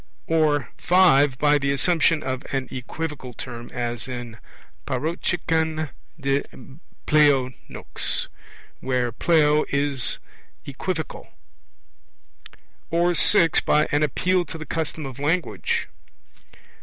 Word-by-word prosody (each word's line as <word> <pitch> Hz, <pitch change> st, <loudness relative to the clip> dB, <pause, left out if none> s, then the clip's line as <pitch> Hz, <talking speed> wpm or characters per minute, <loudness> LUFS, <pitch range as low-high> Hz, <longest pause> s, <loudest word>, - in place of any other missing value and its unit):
Or 155 Hz, -3 st, +1 dB
(5) 145 Hz, -7 st, +4 dB
by 145 Hz, +1 st, +3 dB
the 140 Hz, 0 st, 0 dB
assumption 160 Hz, +2 st, +2 dB
of 130 Hz, -1 st, -3 dB
an 135 Hz, -2 st, -2 dB
equivocal 130 Hz, 0 st, -5 dB
term, 120 Hz, -2 st, -8 dB
as 120 Hz, -1 st, -4 dB
in 120 Hz, -3 st, -7 dB, 0.5 s
parocheken 160 Hz, -1 st, -1 dB, 0.3 s
de 140 Hz, 0 st, +1 dB, 0.6 s
pleo 145 Hz, -4 st, +4 dB, 0.2 s
nux, -, -, -2 dB, 0.5 s
where 125 Hz, -2 st, -1 dB
pleo 150 Hz, +3 st, +3 dB
in 140 Hz, 0 st, 0 dB, 0.7 s
equivocal. 160 Hz, +4 st, -5 dB, 1.6 s
Or 170 Hz, +1 st, +2 dB
(6) 170 Hz, -2 st, +5 dB
by 150 Hz, +1 st, +2 dB
an 145 Hz, -, +2 dB
appeal 180 Hz, +5 st, +1 dB
to 165 Hz, -, -8 dB
the 155 Hz, -, -7 dB
custom 160 Hz, -2 st, -3 dB
of 135 Hz, -1 st, -8 dB
language. 160 Hz, +5 st, -1 dB
150 Hz, 105 wpm, -23 LUFS, 130-160 Hz, 1.6 s, 6